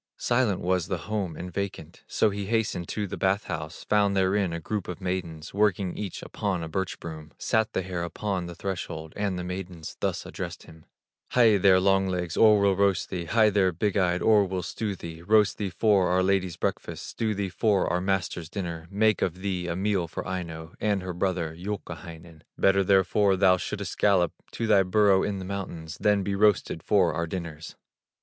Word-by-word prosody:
Silent 120 -6 +1
was 90 -1 0
the - - -1
home, 100 -6 -2
and 90 0 -7
vacant; 100 -1 -5
So 110 - +2
he 100 -1 -4
hastened 110 -6 0
to 105 - -2
the 100 - -6
bath 95 +2 +1
house, 75 0 -6
Found 100 -2 +2
therein 95 0 +2
a 85 - -3
group 105 +3 -4
of 90 - -6
maidens, 90 -4 -4
Working 100 -2 +1
each 100 -4 -5
upon 95 -5 -2
a - - -4
birch 95 +3 -3
broom. 80 -1 -8
Sat 110 -1 0
the 95 - -1
hare 90 -1 -4
upon 90 +1 -3
the 85 - -8
threshold, 85 -4 -5
And 100 -3 -1
the 90 - -4
maidens 90 -3 -6
thus - - -2
addressed - - -6
him: 80 0 -16 0.5
"Hie 115 -4 +6
there, 95 -1 +5
Long 95 0 +3
legs, 90 -2 -2
or 105 -2 +6
we'll 100 -1 +3
roast 100 -1 +1
thee, 90 -2 -3
Hie 110 +4 +4
there, 95 -2 +3
Big 100 +5 -1
eye, 90 -3 +2
or 105 +3 +4
we'll 95 -1 -3
stew 105 -3 -3
thee, 85 -2 -8
Roast 105 +3 +3
thee 100 -2 -1
for 100 -1 +3
our 95 +1 +2
lady's 95 -3 +1
breakfast, - - -3
Stew 110 -2 -2
thee 100 -1 -2
for 100 +1 +2
our 90 - 0
master's 90 -4 -1
dinner, 85 -4 -5
Make 105 +2 +2
of 90 0 -1
thee 90 -3 -2
a 85 - -2
meal 95 -2 0
for 80 - -6
Aino, 85 -3 -5
And 100 -3 0
her 90 -1 -4
brother, 90 -3 -1
Youkahainen! 85 -3 -7 0.2
Better 95 0 +4
therefore 95 +1 +3
thou 95 -1 +4
shouldst - - -5
gallop 95 -5 +3 0.2
To 115 - -2
thy 105 -3 +5
burrow 95 0 +4
in 100 -1 -1
the 95 - -6
mountains, 90 -5 -6
Than 105 -1 +3
be 100 - -2
roasted 100 -5 +2
for 90 -5 +3
our 85 +1 -2
dinners." 80 -3 -6
95 Hz, 200 wpm, -27 LUFS, 85-100 Hz, 0.5 s, Hie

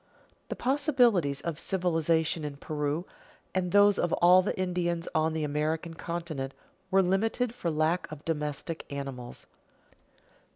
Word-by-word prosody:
The - - -3
possibilities 245 - +2
of 165 -1 -4
civilization 165 -3 0
in 145 -1 -5
Peru, 150 +3 -2 0.5
and 180 -2 0
those 205 0 +5
of 175 - +1
all 180 +2 +6
the 185 - -3
Indians 175 -2 -1
on 160 0 +2
the 160 -1 -1
American 155 +3 -1
continent, 165 -5 -5 0.3
were 195 0 +4
limited 220 +6 +1
for 180 -8 -3
lack 155 +2 0
of 155 -1 -9
domestic 150 +1 -3
animals. 135 -3 -6
165 Hz, 130 wpm, -29 LUFS, 150-185 Hz, 0.5 s, all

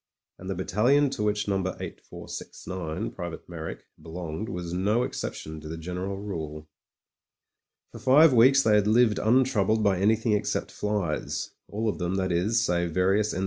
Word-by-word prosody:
And 95 - -8
the 95 - -2
battalion 125 +10 +2
to 135 - -4
which 105 0 0
No. 100 -1 +1
8469, 90 -2 -6
Private 85 -3 -7
Me)rrick, 80 -2 -6 0.2
belonged 85 +4 -6
was 90 -2 -5
no 105 +7 +1
exception 80 -9 -5
to 75 - -9
the 80 - -5
general 90 +4 -4
rule. 80 -6 -6 1.2
For 115 - -10
five 135 +5 +6
weeks 130 +3 +6
they 110 - +3
had 105 -1 +4
lived 110 0 +4
untroubled 110 -3 +2
by 100 -3 +2
any 105 +3 +4
thing 115 0 -1
except 105 -1 -1
flies 105 -7 -2
— - - -28
^all 110 +2 -2
of 105 - -1
them, 90 +1 -1
that 95 -1 0
is, 100 +7 +2
save 85 -1 0
various 95 +3 +2
N. - - -3
100 Hz, 170 wpm, -27 LUFS, 90-110 Hz, 1.2 s, five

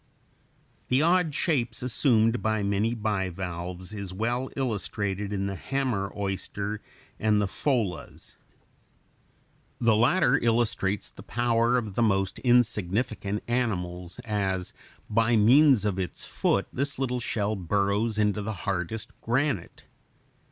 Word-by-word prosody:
The 130 +4 +3
odd 170 -3 +3
shapes 125 -8 0
assumed 120 -3 +2
by 110 -1 0
many 100 +4 +1
bivalves 95 -3 -3
is 100 -3 -5
well 120 +5 -1
illustrated 105 -5 -2
in 100 -1 -1
the 100 - -2
hammer 115 -2 -2
oyster 100 +1 -3
(Fig. - - -22 0.4
90) 110 - -2
and 105 -1 +4
the - - 0
pholas. 105 - -2 1.4
The 115 -2 +4
latter 130 +3 +4
illustrates 115 -4 +1
the - - -12
power 120 0 +2
of 110 -5 -3
the 120 - 0
most 95 -4 +1
insignificant 110 -3 +1
animals, 90 -8 -2
as 95 -4 -1 0.3
by 115 +2 +2
means 125 +1 +6
of 100 -2 0
its 90 -3 -4
foot - - 0
this 140 +2 -1
little 125 -2 -1
shell 110 -2 -1
burrows 100 +4 0
into 105 0 +1
the 110 +2 -3
hardest 100 +3 -2
granite. 125 - -1
110 Hz, 125 wpm, -27 LUFS, 100-120 Hz, 1.4 s, means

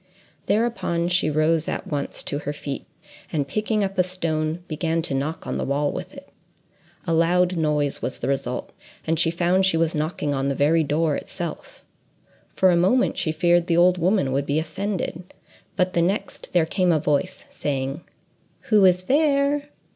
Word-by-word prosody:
Thereupon, 200 -6 0
she 180 -3 +2
rose 155 +1 +1
at - - -3
once 145 -2 -4
to 145 - -3
her 145 0 -4
feet, 140 -2 -6 0.4
and 145 -3 -1
picking 215 +5 0
up 195 -1 -3
a - - +6
stone, 165 -2 -2
began 165 +1 -1
to 150 - -2
knock 145 +4 -3
on - - -3
the - - -1
wall 145 +1 0
with - - -7
it. - - -12 0.8
A 165 - 0
loud 175 +2 +3
noise 150 -3 0
was - - -3
the - - -4
result, 135 -2 -2 0.3
and 160 0 0
she 165 - +3
found 175 +3 +2
she 185 -3 +3
was 165 0 +1
knocking 150 -2 -2
on 135 0 -1
the 140 - 0
very 160 +4 +3
door 150 +1 +1
itself. - - -6 0.7
For 185 -1 +3
a - - +3
moment 195 +10 +3
she 155 - 0
feared 175 +1 +2
the 170 - +2
old 180 +1 +4
woman 180 -5 +2
would 140 +1 -1
be 145 - +1
offended, 180 +1 -4 0.4
but 185 -1 +1
the 170 - +2
next, 190 +5 -2
there 175 -3 +3
came 180 +2 +1
a 160 - +3
voice, 150 +6 -1
saying, 135 +1 -3 0.7
"Who 210 -2 +6
is 180 0 +4
there?" 285 +2 +2
165 Hz, 180 wpm, -23 LUFS, 150-185 Hz, 0.8 s, a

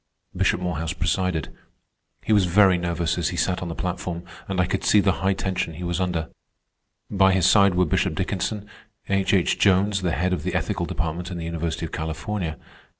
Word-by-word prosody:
Bishop - - +2
Morehouse 85 -2 -2
presided. 90 -5 -1 0.7
He 110 - +1
was 100 -3 +4
very 95 +1 +5
nervous 85 -1 -1
as - - 0
he - - -5
sat 90 - 0
on 90 - -4
the 85 - -5
platform, 90 -1 -4 0.2
and 95 -1 -2
I 90 - +4
could 90 - -2
see 105 - +5
the 100 -1 +3
high 95 +1 +2
tension 95 -4 -2
he 90 - -7
was 85 +1 -1
under. 85 -3 -1 0.8
By 95 -1 +4
his 95 -2 +2
side 100 -1 +5
were 90 0 +3
Bishop 75 - 0
Dickinson; 105 -1 -2 0.4
H. 95 -1 +1
H. 90 - +1
Jones, 100 +1 +3
the 90 -3 0
head 90 +2 0
of 85 - -2
the 90 +2 -3
ethical 90 -2 -1
department 85 +2 -3
in 90 - -5
the 85 - -5
University 85 0 -3
of - - -8
California; 80 +2 -3
Mrs. - - -16
W. - - -26
90 Hz, 210 wpm, -24 LUFS, 85-95 Hz, 0.8 s, very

